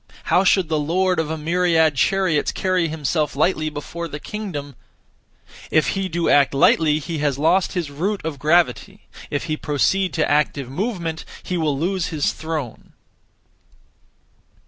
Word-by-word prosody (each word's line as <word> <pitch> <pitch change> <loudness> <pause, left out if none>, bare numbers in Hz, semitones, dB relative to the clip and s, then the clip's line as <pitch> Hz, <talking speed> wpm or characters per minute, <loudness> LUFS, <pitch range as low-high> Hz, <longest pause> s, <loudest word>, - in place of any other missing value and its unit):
How 175 +3 +3
should 190 -2 +3
the 155 -1 0
lord 180 +4 +1
of 160 -2 -1
a 160 - -3
myriad 165 0 +2
chariots 170 +2 +1
carry 185 -3 0
himself 150 -1 -1
lightly 155 +1 +1
before 160 +3 -6
the 150 -1 -7
kingdom? 150 - -6 0.9
If 155 - +2
he 195 -1 -2
do 170 0 -1
act 140 -1 +4
lightly, 150 +2 +4
he 160 +1 -4
has 145 -2 0
lost 170 +6 +2
his 170 -6 -3
root 190 +8 -2
(of 155 -4 -4
gravity); 175 +6 +1 0.3
if 145 - -2
he 155 -2 -2
proceed 180 +6 0
to 160 - +1
active 145 -2 +1
movement, 170 - -3 0.2
he 180 - -3
will 155 -5 0
lose 180 +3 -1
his 155 -4 -1
throne. 155 -7 -6
160 Hz, 150 wpm, -21 LUFS, 150-180 Hz, 0.9 s, act